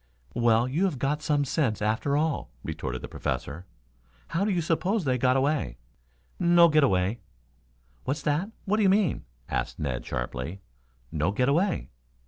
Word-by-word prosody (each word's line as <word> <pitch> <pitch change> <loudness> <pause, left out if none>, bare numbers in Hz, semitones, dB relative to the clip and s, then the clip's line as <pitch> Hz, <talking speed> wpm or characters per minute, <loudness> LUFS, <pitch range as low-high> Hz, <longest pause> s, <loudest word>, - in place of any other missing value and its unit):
"Well, 120 0 +3
you 155 +9 +1
have 180 -8 -1
got 140 +4 -1
some 150 -2 +1
sense 135 -6 0
after 110 +7 +1
all,"' 155 - 0
retorted 65 0 -4
the - - -4
Professor. 80 +8 -4 0.6
"How 170 +4 0
do 210 - +1
you 185 -3 +1
suppose 175 +4 0
they 130 -2 +1
got 130 +2 +3
away?" 135 - 0 0.6
"No 170 -1 +6
get 155 -1 +4
away." 95 -1 +2 0.9
"What's 135 +3 -2
that? 150 +7 0 0.2
What 210 +1 +1
do - - +2
you 195 - +5
mean?" 195 -4 +2 0.2
asked - - -2
Ned 65 -5 -2
sharply. 75 +10 -4 0.5
"No 80 +2 0
get 125 +6 +1
away." 175 +6 +1
140 Hz, 160 wpm, -27 LUFS, 110-170 Hz, 0.9 s, No